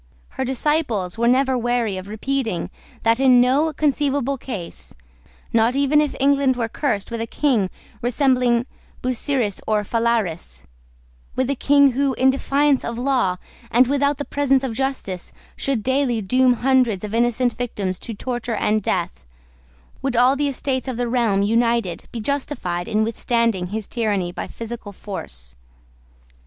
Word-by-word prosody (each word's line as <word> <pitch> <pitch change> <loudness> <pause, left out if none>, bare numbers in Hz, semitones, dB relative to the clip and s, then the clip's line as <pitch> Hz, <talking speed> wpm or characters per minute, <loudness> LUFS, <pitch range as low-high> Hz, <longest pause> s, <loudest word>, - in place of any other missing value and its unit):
Her 265 - -4
disciples 255 - -1
were 235 - +2
never 260 +1 +3
weary 240 -4 0
of 185 +1 -7
repeating 220 -3 -2 0.3
that 230 +1 +3
in 255 -2 +6
no 270 +6 +3
conceivable 285 -2 0
case, 220 -10 -7 0.6
not 230 +2 +3
even 280 +2 +3
if 300 - -1
England 275 -1 +3
were 235 -2 -1
cursed 225 -4 -2
with 230 -1 -3
a 230 - -3
King 235 -11 +1 0.3
resembling 250 -1 +2 0.4
Busiris 250 -4 -1
or 215 -1 +1
Phalaris, 205 - -1 0.7
with 260 +1 0
a - - 0
King 280 +1 +4
who, 270 +1 0
in 260 +1 +4
defiance 275 +1 +1
of 235 0 -4
law, 245 -8 +1 0.3
and 245 +3 +5
without 280 +2 +1
the 285 - -4
presence 275 -2 +1
of 260 -4 -2
justice, 255 -8 -3 0.2
should 265 -6 -1
daily 260 -2 +1
doom 250 +5 +3
hundreds 245 -5 +2
of 210 0 -5
innocent 240 +1 +2
victims 200 -6 -3
to 230 - -6
torture 240 0 -3
and 215 +1 +1
death, 175 - -2 0.8
would 270 -2 -1
all 250 +3 +5
the 290 +1 0
Estates 265 -1 -2
of 255 -3 -3
the 245 0 -1
realm 230 -5 +2
united 230 -4 +1
be 235 - -5
justified 215 -9 -2
in 215 +1 +1
withstanding 230 -4 0
his 210 +2 -4
tyranny 205 -7 -1
by 175 - -5
physical 230 -3 -7
force. 65 - -8
240 Hz, 150 wpm, -21 LUFS, 215-270 Hz, 0.8 s, in